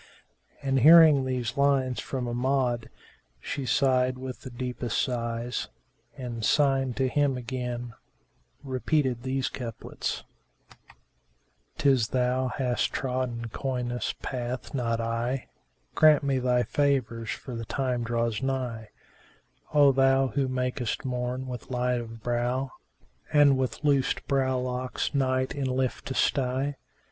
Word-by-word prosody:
And 135 -1 +2
hearing 155 -1 +8
these 125 -1 -2
lines 135 -3 +2
from 130 -2 -3
Amjad 125 -1 0 0.5
she 135 - -4
sighed 130 -2 +2
with 130 0 -7
the - - -8
deepest 125 -1 -3
sighs 120 -1 -2 0.5
and, 120 -3 -5
signing 135 -2 +2
to 135 -1 +1
him 140 0 +1
again, 125 -1 -4 0.7
repeated 130 -1 0
these 130 +1 -1
couplets, 115 -3 -5 1.5
"'Tis 135 -7 +3
thou 130 +1 +1
hast 125 -1 -1
trodden 125 -3 -2
coyness 125 -1 -2
path 125 0 -4
not 115 -4 0
I: 115 +3 -2 0.2
* 60 +1 -43
Grant 155 -2 +6
me 135 -2 +1
thy 125 -1 +2
favours 125 -6 0
for 130 - -5
the 115 0 -5
time 125 0 -1
draws 115 -1 -1
nigh: 125 -5 -3 0.8
O 145 -2 +6
thou 135 0 +3
who 135 +2 0
makest 125 -1 -2
morn 125 0 -2
with 125 -2 -7
light 125 -1 0
of 115 -1 -10
brow, 120 +2 -1 0.3
* - - -30
And 145 -2 +6
with 130 +2 -2
loosed 140 -1 +1
brow 130 -2 +1
locks 125 +2 -2
night 130 -1 +1
in 140 -2 -2
lift 130 0 -1
to 130 - -4
stye! 135 +1 0
130 Hz, 130 wpm, -27 LUFS, 120-135 Hz, 1.5 s, hearing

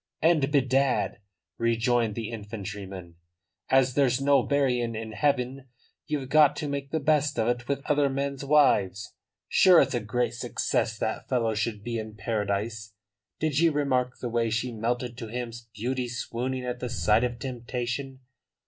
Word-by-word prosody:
"And 155 -4 +3
bedad," 135 -3 +2 0.4
rejoined 115 -1 +1
the 115 -1 -4
infantryman, 100 -5 -7 0.5
"as 130 -1 +4
there's 130 -2 +2
no 140 -1 +4
marryin' 125 -5 0
in 110 0 -5
heaven 135 0 -1 0.4
ye've 145 -3 -2
got 150 +1 +5
to 150 - -3
make 140 -1 -4
the 160 - -1
best 150 -1 +2
of 110 -1 +1
it 120 0 -1
with 140 -1 -2
other 145 -1 +2
men's 140 0 -3
wives. 105 -10 +3 0.3
Sure 180 -3 +6
it's - - +2
a 120 - +1
great 115 +3 -1
success 120 -1 -1
that 110 - -3
fellow 115 -4 +1
should 105 -1 -2
be 115 0 -3
in 110 -1 -7
paradise. 105 0 -3 0.4
Did 155 -3 +1
ye 165 0 +5
remark 130 -4 0
the 120 - -4
way 115 0 0
she 115 +3 -1
melted 120 +2 -2
to 115 - -6
him 120 +1 -4 0.2
beauty 125 +4 -2
swooning 125 +1 -3
at 125 0 -3
the 125 - -4
sight 115 -1 +2
of 120 -1 -1
temptation! 125 +1 -4
125 Hz, 160 wpm, -27 LUFS, 115-140 Hz, 0.5 s, Sure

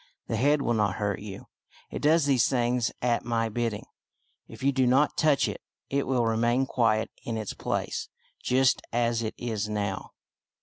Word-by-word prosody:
" - - -53
The - - 0
head 140 +5 +2
will 120 - +1
not 105 -3 +1
hurt 100 -2 -1
you. 100 -2 -8 0.5
It - - -5
does 155 0 +4
these 135 -4 +3
things 120 -2 +1
at 120 -1 +1
my 115 -1 0
bidding. 115 -1 -2 0.6
If - - -11
you 140 - +4
do 130 -2 +2
not 135 +4 +3
touch 150 -3 +3
it, - - -5 0.3
it 140 0 0
will 125 -3 +1
remain 120 +3 +2
quiet 115 -4 +1
in 115 -1 -3
its 110 -2 -4
place, - - -3 0.3
just 130 0 +3
as 115 0 +1
it 110 -1 -3
is 110 -3 -3
now." 100 -2 -3
120 Hz, 180 wpm, -27 LUFS, 110-130 Hz, 0.6 s, does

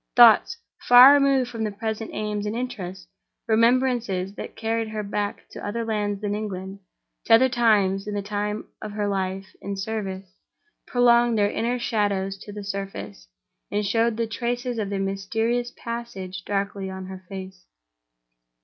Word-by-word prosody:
Thoughts, 240 - +7 0.2
far 250 +3 +9
removed 275 -3 +3
from 225 -2 -3
her 215 - 0
present 220 +1 -4
aims 210 -1 -3
and 210 - -3
interests; 200 -7 -5 0.4
remembrances 230 -4 +2
that - - -8
carried 225 0 -1
her 215 -1 -4
back 205 0 -3
to - - -9
other 230 +3 -3
lands 205 -2 -1
than 205 -1 -1
England, 195 -2 -5 0.5
to 225 - +7
other 260 +3 +5
times 210 -6 +2
than 210 0 -4
the 200 - -2
time 210 +1 -3 0.2
of 215 -1 -6
her 205 -1 -1
life 190 -1 -2 0.2
in 200 0 -4
service, 195 -2 -4 0.6
prolonged 240 -1 +4
their 205 -1 +2
inner 240 +2 -1
shadows 205 -5 0
to 205 - -10
the 205 0 -7
surface, 195 - -6 0.4
and 205 +1 -1
showed 225 +2 +1
the 230 - 0
traces 240 +2 -3
of 205 -2 -2
their 200 - -2
mysterious 225 +5 -1
passage 195 -6 -6
darkly 200 -1 -2
on 190 0 -6
her 190 0 -9
face. 190 - -9
210 Hz, 160 wpm, -24 LUFS, 195-230 Hz, 0.6 s, far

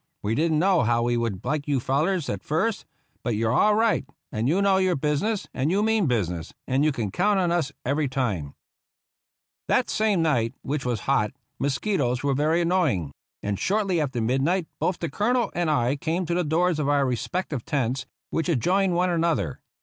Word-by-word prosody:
We 105 - 0
didn't 155 +5 +2
know 185 +1 +3
how 120 0 +2
we 120 0 +1
would 115 -4 -2
like 145 +2 -1
you 140 -2 +1
fellars 155 +7 0
at 100 -2 -3
first; 190 - -1 0.4
but 120 -3 0
you're 110 +2 +1
all 210 +10 +4
right, 225 +1 +2 0.3
and 110 +4 -1
you 175 +6 +2
know 200 -1 +3
your 185 -2 +2
business, 150 +9 -1
and 135 +3 0
you 200 +4 +2
mean 220 -5 +2
business, 90 -9 -2
and 135 +2 +2
you 155 - +3
can 115 -8 -3
count 200 - +2
on 175 -2 +1
us 165 -5 0
every 140 +3 +1
time! 105 - -2 0.5
" - - -73
That - - +2
same 210 -6 +2
night, 120 -8 +1
which 140 0 -3
was 120 -5 -1
hot, 130 -6 +1 0.3
mosquitoes 140 - 0
were 140 -1 +2
very 155 +5 +2
annoying; 165 - +1 0.3
and 100 -1 -2
shortly 195 -4 +1
after 135 -5 -2
midnight 135 +10 +1
both 180 - 0
the 170 - -3
Colonel 235 - 0
and 175 -2 0
I 130 -2 +1
came 170 +5 -1
to 170 - -2
the 180 +1 +1
doors 165 +1 +1
of 145 -1 0
our 145 -1 +3
respective 130 - -2
tents, 130 -2 -1 0.2
which 165 +2 -1
adjoined 180 +5 +2
one 180 +1 +2
another. 160 - 0
150 Hz, 195 wpm, -25 LUFS, 125-180 Hz, 0.5 s, all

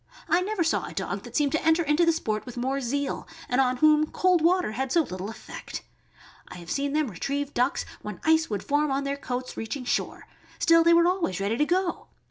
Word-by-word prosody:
I 340 +2 +3
never 390 -1 -1
saw 325 - 0
a - - -10
dog - - -3
that - - -11
seemed 290 -2 +2
to 315 - 0
enter 320 +1 +3
into 310 +3 +2
the - - +6
sport 215 -10 -2
with 245 -2 -10
more 265 +3 -1
zeal, 280 +3 -2 0.2
and 250 +2 +2
on 255 -1 +1
whom 305 +2 +4
cold 365 -2 +2
water 360 -5 +2
had 260 +3 -3
so 335 - +4
little 190 -5 -6
effect. 225 - -8 0.6
I - - -10
have 175 -1 -9
seen 280 0 -1
them 300 -6 0
retrieve 280 - -3
ducks 250 +3 0 0.2
when - - -7
ice 320 0 +3
would 205 -3 -3
form 295 +1 +1
on 275 +1 0
their 280 0 -2
coats 255 -2 -4
on - - -6
reaching 250 +4 -5
shore; - - -2 0.3
still 330 0 +5
they 335 0 +6
were 340 0 +5
always 350 - 0
ready 200 +3 0
to 295 - +3
go. 360 +2 -1
285 Hz, 230 wpm, -26 LUFS, 250-330 Hz, 0.6 s, the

